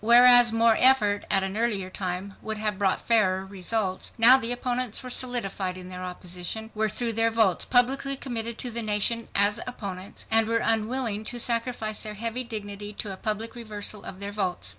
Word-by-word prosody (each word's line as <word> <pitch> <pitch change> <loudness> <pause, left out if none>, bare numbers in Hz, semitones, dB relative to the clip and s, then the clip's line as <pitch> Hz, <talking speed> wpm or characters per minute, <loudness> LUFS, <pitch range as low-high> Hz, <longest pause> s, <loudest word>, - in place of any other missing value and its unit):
Whereas 245 +1 +7
more 225 0 +3
effort, 215 -6 +4
at 195 - +2
an 190 +1 -4
earlier 210 -5 -1
time, 185 +1 -4
would 220 0 -5
have 210 -2 -3
brought 195 -2 0
fairer 190 -5 +2
results, 195 0 -3
now 235 +3 +8
the 245 -3 -1
opponents 245 -1 -2
were 255 - -7
solidified 200 -8 -1
in 180 0 -10
their 185 0 -7
opposition, 180 +4 -6
were 220 0 -1
through 230 +2 -2
their 225 +1 +2
votes 220 -6 +2
publicly 270 +2 +1
committed 235 -3 -3
to 245 - -4
the 235 +1 0
nation 220 +2 +1
as 205 +1 +5
opponents, 195 -6 -7
and 225 0 +3
were 230 0 +1
unwilling 225 -1 -1
to 240 +2 -3
sacrifice 230 -2 0
their 215 -1 -5
heavy 230 +4 -2
dignity 205 -3 -7
to 200 -1 -5
a - - -7
public 215 +3 -3
reversal 215 -3 -5
of 190 - -9
their 200 0 -4
votes. 185 - -1
220 Hz, 185 wpm, -25 LUFS, 200-235 Hz, -, now